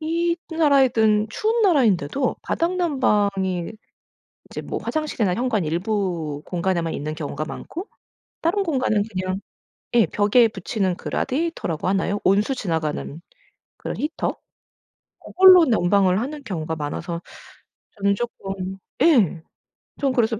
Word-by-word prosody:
이 335 +2 0
나라이든 255 -9 +3
추운 445 - 0
나라인데도 260 - +2
바닥난방이 210 - 0 0.8
이제 - - -5
뭐 - - -4
화장실이나 300 -11 -1
현관 220 -3 0
일부 170 -4 -2
공간에만 170 -2 -1
있는 155 +2 -4
경우가 155 0 -4
많고 350 - -7 0.5
다른 350 +5 +1
공간은 260 - +1
그냥 185 0 -2 0.6
예 235 -2 +6
벽에 210 +7 +4
붙이는 190 -2 -2
그 - - -8
라디에이터라고 265 - -2
하나요? 195 +2 0
온수 205 +8 +2
지나가는 160 - -3 0.6
그런 - - -5
히터? 305 +2 -2 0.8
고걸로 370 -2 +7
난방을 195 - +3
하는 285 +5 -5
경우가 160 -7 -4
많아서 160 +3 -4 0.8
저는 200 0 +2
쪼끔 195 -4 -5 0.2
예 225 - +4 0.6
좀 275 -2 +1
그래서 230 -2 +1
210 Hz, 285 characters per minute, -22 LUFS, 180-280 Hz, 0.8 s, 고걸로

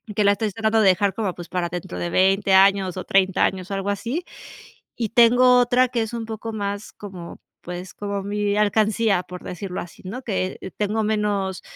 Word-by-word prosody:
que 210 - +2
la 200 - +5
estoy 210 +1 -1
tratando 225 0 +1
de 210 - +4
dejar 190 +2 +3
como, 200 -3 -3
pues, 175 -1 -9
para 180 -1 -1
dentro 175 +1 -6
de 175 - -2
20 195 +2 +2
años 195 -1 +4
o 185 - -4
30 195 -1 +2
años, 185 -1 -1
algo 195 0 -2
así. 235 - -2 0.7
Y 225 -3 -2
tengo 245 +2 +6
otra 245 +1 +3
que 240 -2 -1
es 220 - -7
un 230 -1 -4
poco 220 0 -6
más 205 0 -4
como, 185 -4 -10 0.2
pues, 180 +1 -7
como 200 -1 -4
mi 205 0 -1
alcancía, 210 -1 +2
por 180 0 -10
decirlo 180 +1 -5
así, 175 - -11
¿no?, 245 +8 -6
que 190 -3 -3
tengo 215 +1 0
menos 205 -3 -1
200 Hz, 195 wpm, -22 LUFS, 190-220 Hz, 0.7 s, tengo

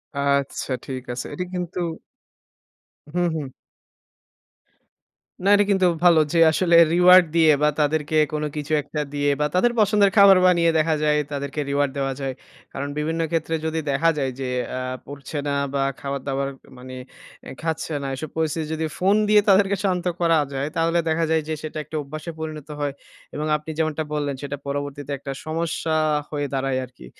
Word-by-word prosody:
আচ্ছা, 140 -1 -1
ঠিক 130 -2 -5
আছে। 120 - -5
এটা 180 - -3
কিন্তু 180 0 -4 1.4
হুম, 175 0 +2
হুম। 150 -3 -3 2.0
না, - - +4
এটা 205 0 +3
কিন্তু 190 -2 +3 0.2
ভালো 170 -2 +6
যে, 170 - +2
আসলে 170 +1 +2 0.2
reward 180 +1 +7
দিয়ে 160 -2 +6
বা - - +5
তাদেরকে 150 +1 0 0.2
কোন 150 0 -1
কিছু 150 +1 -3
একটা 150 +1 -4
দিয়ে 145 0 +1
বা 150 - +2
তাদের 240 +7 +3
পছন্দের 205 -1 +4
খাবার 200 -2 +8
বানিয়ে 170 -2 +4
দেখা 155 0 +2
যায়, 150 0 +3
তাদেরকে 140 +1 -4
reward 140 -1 +1
দেওয়া 135 -1 -1
যায়। 135 -1 -2 0.4
কারণ 140 +1 -4
বিভিন্ন 160 +2 -1
ক্ষেত্রে 165 0 -1
যদি 160 0 -1
দেখা 165 +4 +3
যায় 135 -2 -1
যে, 135 - -3 0.3
আ - - -2 0.3
পড়ছে 145 +2 -8
না 145 - 0 0.2
বা 140 - 0 0.2
খাবার-দাবার 140 0 -3 0.2
উ - - -17
মানে 130 +1 -9 0.5
এ - - -7
খাচ্ছে 160 -1 -3
না। - - -3
এসব 155 +3 -6
পরিস্থিতি 160 0 -1
যদি 160 0 -2
ফোন 195 +3 +3
দিয়ে 210 0 +6
তাদেরকে 195 0 +4
শান্ত 185 -3 0
করা 165 -2 +3 0.2
যায়, 135 +1 -2
তাহলে 165 +1 +2
দেখা 160 +1 +1
যায় 160 - +3
যে, 160 - -2
সেটা 155 0 -6
একটা 155 - -10
অভ্যাসে 155 +4 -7
পরিণত 155 -2 -6
হয়। 145 -1 -1 0.4
এবং 150 - -2
আপনি 150 +1 -8
যেমনটা 155 -1 0
বললেন, 145 -2 -1
সেটা 145 0 -5
পরবর্তীতে 145 0 -4
একটা 140 +1 -7
সমস্যা 160 0 -2 0.3
হয়ে 145 -1 -2
দাঁড়ায় 135 -1 0
আরকি। 125 - -16
155 Hz, 170 wpm, -23 LUFS, 140-170 Hz, 2.0 s, খাবার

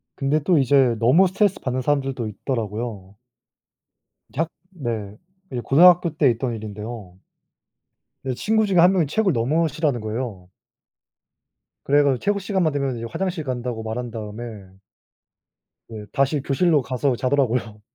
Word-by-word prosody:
근데 145 +2 +1
또 175 +1 +3
이제 135 -3 +4
너무 130 - +5
스트레스 195 +1 +1
받는 130 0 -2
사람들도 135 -3 -1
있더라고요. 105 -2 -5 1.2
작 160 +3 0 0.2
네. 115 - -5 0.4
이제 125 -2 -3
고등학교 170 +4 +5
때 145 -4 +4
있던 120 +1 -3
일인데요. 105 -2 -8 1.1
네 130 - -1
친구 220 - +1
중에 195 -3 0
한 180 +3 +6
명이 175 -6 +2
체육을 195 +5 +1
너무 145 +8 +1
싫어하는 150 -5 -1
거예요. 110 -4 -5 1.4
그래 145 +1 +4
가지고 135 -3 +2
체육 205 0 0
시간만 190 -4 0
되면 140 -3 -1
이제 115 - -5
화장실 180 - -3
간다고 125 -4 -4
말한 120 +2 -4
다음에 110 -2 -8 1.2
네. 110 -2 -8
다시 140 +2 +1
교실로 150 +3 +2
가서 130 +1 -1
자더라고요. 125 -4 0
130 Hz, 320 characters per minute, -22 LUFS, 115-155 Hz, 1.4 s, 한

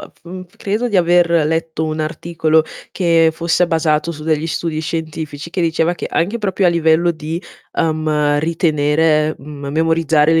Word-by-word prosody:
f - - -14
f 185 +1 -10
credo 215 +5 -2
di 205 - 0
aver 175 -1 +4 0.2
letto 160 0 -2
un 155 0 -3
articolo 160 0 0 0.3
che 165 -3 +3
fosse 170 +2 +1
basato 160 -1 0
su 150 - -10
degli 155 0 0
studi 160 -1 -2
scientifici, 160 -1 -5
che 180 - -3
diceva 165 0 +1
che - - -5
anche 200 +8 -1
proprio 195 -2 0
a - - +6
livello 170 0 +3
di, 160 +2 -5 0.3
uhm, 155 -2 +1
ritenere 155 -1 +1
m 140 0 -9
memorizzare 160 0 +2
le 160 - +4
160 Hz, 160 wpm, -17 LUFS, 155-170 Hz, 0.3 s, a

